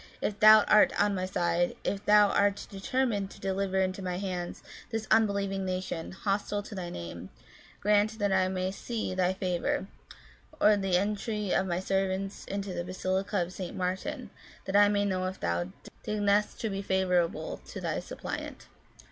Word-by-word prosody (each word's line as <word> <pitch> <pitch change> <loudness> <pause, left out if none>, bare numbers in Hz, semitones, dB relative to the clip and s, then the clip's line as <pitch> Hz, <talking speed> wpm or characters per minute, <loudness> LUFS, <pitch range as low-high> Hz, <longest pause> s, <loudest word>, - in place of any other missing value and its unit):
if 205 -1 -2
Thou 215 0 +9
art 210 - +5
on 205 0 +3
my 185 -1 -2
side, 175 -1 0
if 200 0 -2
Thou 210 -1 +6
art 200 0 +1
determined 205 0 -1
to - - -13
deliver 190 0 -1
into 185 0 0
my 180 -1 -3
hands 180 -2 -4 0.3
this 225 -2 -3
unbelieving 200 -3 +2
nation, 185 -3 -3
hostile 205 +1 -2
to 210 - -10
Thy 180 -3 -5
name, 85 - -7 0.5
grant 210 +2 +3
that 205 -2 0
I 190 -1 +3
may 185 0 -1
see 220 0 -4
Thy 185 -1 +2
favour, 185 -1 -1 0.7
or 210 0 +6
the 195 -3 +1
entry 210 +1 -1
of 190 - +2
my 175 -1 -1
servants 195 +1 -1
into 200 -1 -4
the 175 -1 -3
basilica 185 +1 -1
of 175 +2 -8
St 185 -2 -6
Martin, 185 +1 -3 0.3
that 195 - -3
I 205 0 +7
may 205 0 +1
know 185 -2 0
if 190 +1 -6
Thou 85 +1 -1 0.4
deignest 210 0 +1
to 220 - -1
be 195 0 -3
favourable 185 -3 0
to - - -7
Thy - - -2
suppliant." - - -6
195 Hz, 170 wpm, -29 LUFS, 185-205 Hz, 0.7 s, Thou